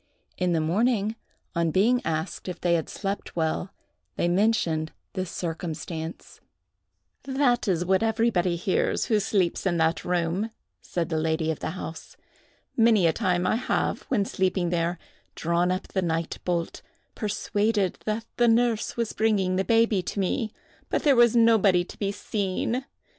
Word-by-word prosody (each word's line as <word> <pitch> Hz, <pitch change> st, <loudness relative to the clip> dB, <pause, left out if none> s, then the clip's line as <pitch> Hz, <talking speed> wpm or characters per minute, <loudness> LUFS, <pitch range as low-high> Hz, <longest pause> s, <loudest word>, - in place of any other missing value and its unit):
In 180 Hz, -1 st, 0 dB
the 165 Hz, -, +2 dB
morning, 210 Hz, +6 st, +1 dB, 0.4 s
on 170 Hz, -1 st, +1 dB
being 225 Hz, +9 st, +3 dB
asked 160 Hz, +4 st, -3 dB
if 180 Hz, -2 st, -5 dB
they 175 Hz, -1 st, +2 dB
had 165 Hz, -2 st, 0 dB
slept 200 Hz, 0 st, -4 dB
well, 165 Hz, +3 st, -1 dB, 0.4 s
they -, -, +1 dB
mentioned 175 Hz, -5 st, +1 dB, 0.2 s
this 185 Hz, -2 st, -3 dB
circumstance. 165 Hz, -1 st, -5 dB, 0.8 s
"That 265 Hz, -3 st, +1 dB
is 175 Hz, -2 st, +1 dB
what 190 Hz, +2 st, +3 dB
everybody 220 Hz, -6 st, +2 dB
hears 175 Hz, +2 st, 0 dB
who 215 Hz, -2 st, +2 dB
sleeps 195 Hz, -3 st, 0 dB
in 175 Hz, -2 st, +1 dB
that 160 Hz, 0 st, +1 dB
room," 175 Hz, +4 st, 0 dB, 0.3 s
said 170 Hz, -1 st, -3 dB
the 160 Hz, -2 st, 0 dB
lady 160 Hz, 0 st, 0 dB
of 155 Hz, -, -5 dB
the -, -, -3 dB
house. 160 Hz, -3 st, -8 dB, 0.6 s
"Many 225 Hz, -5 st, +5 dB
a 165 Hz, -, +4 dB
time 180 Hz, +1 st, 0 dB
I -, -, +2 dB
have, 250 Hz, -, 0 dB
when 210 Hz, -7 st, +1 dB
sleeping 185 Hz, -2 st, 0 dB
there, 170 Hz, 0 st, 0 dB, 0.4 s
drawn 170 Hz, +2 st, +1 dB
up 185 Hz, +2 st, -3 dB
the 190 Hz, -, -1 dB
night 165 Hz, -1 st, -2 dB
bolt, 170 Hz, -2 st, -2 dB, 0.3 s
persuaded 205 Hz, -1 st, 0 dB
that 220 Hz, +1 st, -2 dB
the 240 Hz, -, +4 dB
nurse 230 Hz, -1 st, +2 dB
was 230 Hz, -2 st, -1 dB
bringing 200 Hz, -4 st, +1 dB
the 190 Hz, -, +1 dB
baby 225 Hz, -2 st, +3 dB
to 190 Hz, -, -4 dB
me; 210 Hz, +3 st, 0 dB, 0.4 s
but -, -, 0 dB
there 285 Hz, -3 st, +5 dB
was 240 Hz, -1 st, +5 dB
nobody 220 Hz, -6 st, +5 dB
to -, -, -13 dB
be 200 Hz, -1 st, 0 dB
seen. 205 Hz, +5 st, -2 dB
185 Hz, 160 wpm, -26 LUFS, 170-220 Hz, 0.8 s, Many